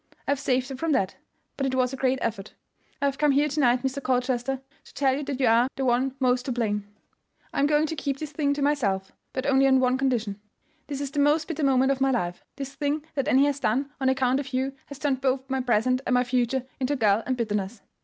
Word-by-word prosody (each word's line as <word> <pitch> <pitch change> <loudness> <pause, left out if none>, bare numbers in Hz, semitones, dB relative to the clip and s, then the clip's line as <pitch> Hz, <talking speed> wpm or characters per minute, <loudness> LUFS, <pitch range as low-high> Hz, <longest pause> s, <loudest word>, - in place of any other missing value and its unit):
I - - +2
have 285 - +1
saved 260 -2 0
her 270 - -5
from 315 +4 -1
that; 190 -7 0 0.4
but 275 - 0
it 260 - -1
was 255 0 +1
a - - -2
great 260 0 +1
effort. 205 -3 -4 0.5
I - - +4
have 275 0 -1
come 300 - +3
here 290 +2 +3
to 295 +1 -3
night, 250 -2 +3
Mr. 265 +1 -2
Colchester, 255 0 0 0.3
to - - -17
tell 265 -2 +2
you 285 - -3
that 275 -2 -4
you 265 - +3
are 235 +2 +4
the 270 - -2
one 255 +2 +1
most 250 -1 +2
to 265 - -2
blame. 210 -4 -1 0.7
I - - -1
am 280 - +4
going 300 +1 +3
to 320 - -3
keep 275 -2 -2
this 305 0 -6
thing 285 -1 0
to 285 - -2
myself; 200 -10 0 0.2
but 260 - -3
only 270 -1 +4
on 265 -1 +4
a 255 0 +2
condition. 230 -7 -1 0.5
This 280 -1 -4
is 280 -1 -4
the 290 - -2
most 295 +2 +3
bitter 320 -2 -3
moment 265 -1 +3
of 270 -1 -2
my 270 - +4
life; 175 -9 -2
this 275 -1 -6
thing 290 +2 -2
that 275 -2 -1
Annie 270 +2 +5
has 285 -1 0
done 275 +4 0
on 265 - +3
account 265 0 +2
of 270 -2 -6
you 265 +1 0
has 285 - -9
turned 275 -3 -1
both 265 0 0
my 265 0 +1
present 250 +1 +2
and 250 - +2
my 250 - +4
future 250 +1 0
into 270 +2 0
gall 215 -4 +3
and 260 -1 0
bitterness. 210 -2 -2
265 Hz, 255 wpm, -26 LUFS, 250-280 Hz, 0.7 s, Annie